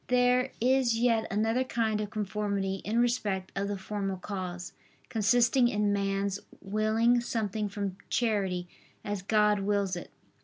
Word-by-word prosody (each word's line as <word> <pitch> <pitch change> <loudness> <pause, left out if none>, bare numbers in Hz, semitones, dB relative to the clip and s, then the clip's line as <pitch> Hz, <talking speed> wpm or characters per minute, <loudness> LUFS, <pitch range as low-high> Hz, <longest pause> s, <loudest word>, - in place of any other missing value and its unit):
There 250 0 +3
is 250 -1 +3
yet 230 -2 +2
another 225 +5 +1
kind 220 -4 0
of 210 - -4
conformity 200 -2 -2
in 220 +3 -1
respect 210 -6 0
of 195 +1 -1
the 205 0 -2
formal 195 0 -3
cause, 180 -2 -5 0.4
consisting 240 +3 +3
in 210 -3 +1
man's 200 0 -1 0.2
willing 220 +4 +2
something 215 -3 -2
from 200 -2 -4
charity, 195 -6 0 0.4
as 205 -2 -2
God 210 +1 +3
wills 200 -1 0
it. 175 - -7
210 Hz, 140 wpm, -29 LUFS, 195-230 Hz, 0.4 s, There